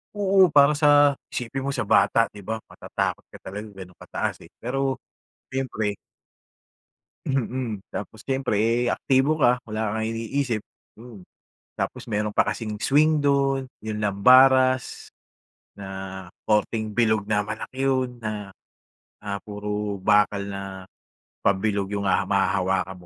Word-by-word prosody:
Oo, 195 -2 +5
para 145 +1 +6
sa 145 -2 +5 0.2
isipin 130 +2 -3
mo 140 - -1
sa 120 - -2
bata, 110 +3 +4
'di 100 -2 -13
ba, 110 +1 -3
matatakot - - -3
ka - - -9
talaga 105 +3 -6
gano'n 95 -2 -11
kataas, - - -4
eh, - - -19
pero 135 +2 -1 0.5
syempre 115 -6 -2 1.3
Mm. 125 -5 -2
Tapos 110 +2 -7
siyempre, 135 -6 0 0.2
eh, 120 - +1
aktibo 140 +4 +2
ka 125 -3 +5
wala 110 -1 -3
kang 110 0 -1
iniisip, 115 +1 -2 0.4
mm. 115 -6 -12 0.5
Tapos - - -4
meron 105 -1 -1
pa - - +2
kasing 105 -2 -3
swing 150 +4 +3
do'n 140 -2 +1 0.2
yung 110 -1 -4
lambaras 130 +5 +4 0.7
na 95 -1 -7 0.2
korteng 110 0 0
bilog 110 -3 +2
na 105 -1 +1
malaki 110 +5 -5
'yon 130 -2 0
na, 105 -3 -5 0.7
ah, 100 -1 -4
puro 105 -1 -4
bakal 105 +1 +3
na 100 0 -5 0.8
pabilog 100 0 +1
yung 100 -1 -1
haha 90 - +2
mahahawakan 95 -1 0
110 Hz, 130 wpm, -24 LUFS, 100-130 Hz, 1.3 s, para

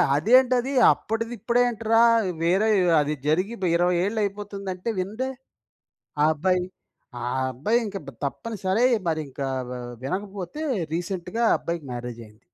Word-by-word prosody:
అదేంటది 250 - +4 0.2
అప్పటిది 225 +2 -4
ఇప్పుడు 235 +4 +1
ఏంట్రా, 225 -1 +2 0.4
వేరే 190 +6 +3 0.3
అది 150 +1 -1
జరిగి 185 +9 +1
బ్ - - 0
20 175 +1 +2
ఏళ్ళు 220 +2 -1
అయిపోతుందంటే 200 -1 -4
వినడే, 220 +8 -3 0.9
ఆ - - +5
అబ్బాయి. 180 +3 +1 0.6
ఆ - - -3 0.3
అబ్బాయి 185 - +1
ఇంక 200 -1 -6
బ్ 140 - -6
తప్పనిసరై 210 - 0 0.2
మరి 160 -1 0
ఇంకా 135 0 -4 0.2
వా 125 - -5 0.3
వినకపోతే 195 - -4 0.3
రీసెంట్‌గా 175 +6 -3
ఆ - - +5
అబ్బాయికి 170 -4 -4
మ్యారేజ్ 120 -1 -6
అయింది. 105 0 -20
190 Hz, 135 wpm, -25 LUFS, 165-225 Hz, 0.9 s, ఆ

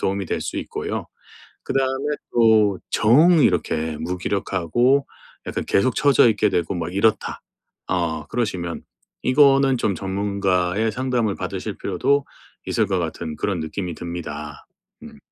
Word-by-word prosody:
도움이 100 0 -1
될 - - -2
수 - - -5
있고요. - - -4 0.6
그 - - -3
다음에 135 +2 0 0.2
또 110 -5 +4
정 155 +10 +5
이렇게 80 - 0
'무기력하고 95 - 0 0.4
약간 - - -3
계속 115 +5 +2
처져 140 -4 +5
있게 105 -1 +1
되고 90 +1 -1
막 85 0 -4
이렇다.' 105 +3 +1 0.5
어 80 -5 -1
그러시면 95 -8 -3 0.4
이거는 135 -1 +4
좀 105 -4 0
전문가의 100 +1 0
상담을 125 -5 -1
받으실 - - -5
필요도 140 0 0 0.4
있을 110 - +1
것 95 -1 0
같은 80 -2 -4
그런 95 +3 -1
느낌이 85 +3 -4
듭니다. 75 -4 -7 0.4
음. 225 -2 -12
100 Hz, 280 characters per minute, -22 LUFS, 85-125 Hz, 0.6 s, 정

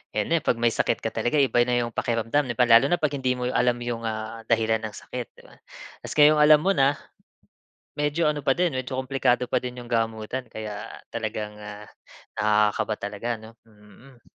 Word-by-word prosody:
ayan 105 - 0
na 170 - +4
'pag 125 - 0
may 120 0 +2
sakit - - 0
ka - - -2
talaga 120 - -1
eh, 140 -2 +4
iba 120 - +3
na 125 - +1
'yong 120 - -5
pakiramdam 115 +5 0
lalo 120 0 +6
na 175 - +2
'pag 150 -2 0
hindi 130 -2 0
mo 125 - -5
alam 125 -1 +2
'yong 120 -1 -5
ah, 110 +1 -5
dahilan 110 -1 +2
ng 110 -2 -7
sakit, 125 -1 -7
'di - - -17
ba? - - -18 0.4
Tapos - - -8
ngayon 150 0 +6
alam 150 0 +7
mo 195 - +3
na, 140 -3 +3 1.0
medyo 150 +2 +1
ano 150 -2 -2
pa - - +4
din, 175 -5 0
medyo 130 0 -4
kumplikado 125 -2 0
pa - - 0
din 125 0 -3
'yong 120 - -11
gamutan 115 +2 -2
kaya 105 -1 -6 0.2
talagang 110 -2 -5
ah, 105 0 -10 0.5
nakaka-kaba 105 0 +2
talaga 105 +3 -5
'no? 110 +1 -14
Mm. 110 +4 -19
120 Hz, 195 wpm, -25 LUFS, 110-135 Hz, 1.0 s, alam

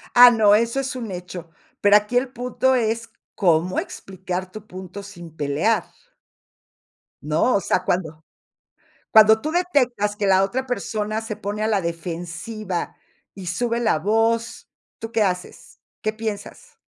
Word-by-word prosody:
Ah, 245 0 +10
no, 215 -3 +5
eso 230 +4 +1
es 270 0 -3
un 230 -5 -5
hecho, 175 -2 -7 0.3
pero 205 0 +6
aquí 210 +4 +3
el 255 +1 +1
punto 250 +1 0
es, 230 -1 -1 0.3
cómo 175 -1 +2
explicar 185 -1 -6
tu 215 +1 -10
punto 185 0 -9
sin 175 -5 -11
pelear. 150 +10 +1 1.4
No, 155 +11 +2
o 200 - +2
sea, 185 - 0
cuando 160 -3 -2 0.9
cuando 220 0 +7
tú 310 - -3
detectas 255 - +1
que 205 -1 -1
la 190 0 +5
otra 260 +7 -2
persona 215 -3 -2
se 220 -2 -5
pone 210 +1 -4
a - - +1
la 210 -3 +1
defensiva 175 +3 -5 0.4
y 190 -3 -9
sube 235 +6 -1
la 235 -9 +2
voz, 225 +4 0 0.3
¿tú 225 0 -6
qué 225 -2 +2
haces? 180 -2 -4 0.2
¿Qué 215 - 0
piensas? 225 - -6
210 Hz, 150 wpm, -22 LUFS, 185-230 Hz, 1.4 s, Ah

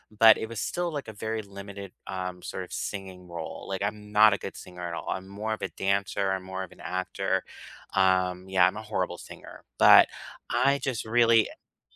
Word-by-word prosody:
But 110 +1 +8
it 110 - -4
was 115 - -5
still, 175 -1 -2
like, 145 -5 -4
a 110 - -7
very 110 +2 -3
limited, 100 -1 -9
um, 90 -1 -5
sort 95 - -5
of - - -12
singing 95 -3 -5
role, 85 -1 -7
like, 95 0 -3
I'm 105 0 -3
not 105 -1 +7
a - - 0
good - - -7
singer 90 -1 -10
at 85 - -5
all. 85 - -5
I'm 95 0 -3
more 105 +3 -4
of - - -6
a - - -1
dancer, 100 0 0
I'm 95 -1 -2
more 95 0 -5
of 90 - -10
an - - -17
actor, 95 0 -1 0.5
um, 95 -1 +2
yeah 95 -2 +5
I'm 100 +3 -2
a - - -5
horrible 95 -4 -2
singer. - - -12 0.2
But - - +9 0.4
I 140 +1 +3
just 125 -6 -2
really 115 -1 +4
eh - - -21
100 Hz, 210 wpm, -27 LUFS, 95-110 Hz, 0.5 s, But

